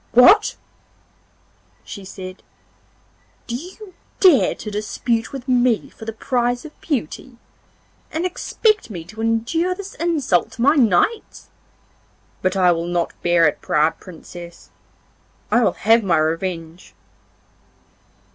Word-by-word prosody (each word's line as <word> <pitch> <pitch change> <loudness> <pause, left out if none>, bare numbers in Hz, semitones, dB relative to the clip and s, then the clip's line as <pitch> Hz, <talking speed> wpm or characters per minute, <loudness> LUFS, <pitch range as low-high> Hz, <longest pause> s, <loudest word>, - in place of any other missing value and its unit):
'What!' 390 - +6 1.3
she 200 - -9
said, 185 -1 -9 1.0
'do 235 - -4
you 370 - -9 0.3
dare 355 -9 +5
to 215 - -7
dispute 225 +3 -2
with 270 -1 -8
me 245 -3 +2
for 220 - -12
the 225 - -3
prize 245 +2 -1
of 310 - -13
beauty, 260 - -4 0.7
and 325 +3 -2
expect 420 - 0
me 175 -6 -7
to 215 +6 -10
endure 230 +11 0
this 400 +1 -8
insult 300 - 0
to 230 - -3
my 285 +3 +6
knights? 265 - +1 0.9
But 185 +1 0
I 180 -2 +5
will 170 0 -1
not 175 -1 -1
bear 170 -2 +4
it, 150 - -2
proud 155 +2 +1
Princess. 175 0 -12 0.8
I 240 - +4
will - - +2
have 225 +1 +3
my 180 -4 +2
revenge. 165 +1 -3
225 Hz, 125 wpm, -20 LUFS, 180-280 Hz, 1.3 s, What